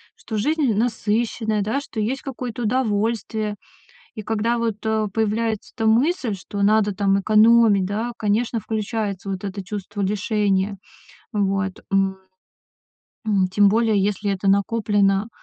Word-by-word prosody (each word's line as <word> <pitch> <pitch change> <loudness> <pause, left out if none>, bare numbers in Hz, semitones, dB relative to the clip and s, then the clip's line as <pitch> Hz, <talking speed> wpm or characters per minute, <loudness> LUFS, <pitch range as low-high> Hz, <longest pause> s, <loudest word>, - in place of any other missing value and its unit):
что 220 - -6
жизнь 290 +1 +1
насыщенная, 220 -1 0
да, 225 +8 -1
что 245 - -7
есть 245 +6 -1
какое-то 245 -3 -5
удовольствие. 220 -2 -1 0.6
И 215 - -5
когда 225 +3 0
вот, 225 -3 -1
э, 220 -1 +1
появляется 220 0 -1
эта 225 -2 0
мысль, 250 - +2
что 200 +2 -6
надо, 210 0 +3
там, 195 0 +2
экономить, 215 -1 +5
да, 215 +5 -2
конечно, 225 +3 0
включается 210 -2 -3
вот 190 0 -4
это 200 0 -5
чувство 205 +1 -5
лишения. 200 0 0 0.6
Вот. 195 -2 -1
М, 195 -1 +2 1.1
м, 200 -4 +2
тем 200 +2 +4
более, 220 -1 +2
если 205 0 0
это 195 0 -1
накоплено 200 0 +2
210 Hz, 130 wpm, -22 LUFS, 200-225 Hz, 1.1 s, экономить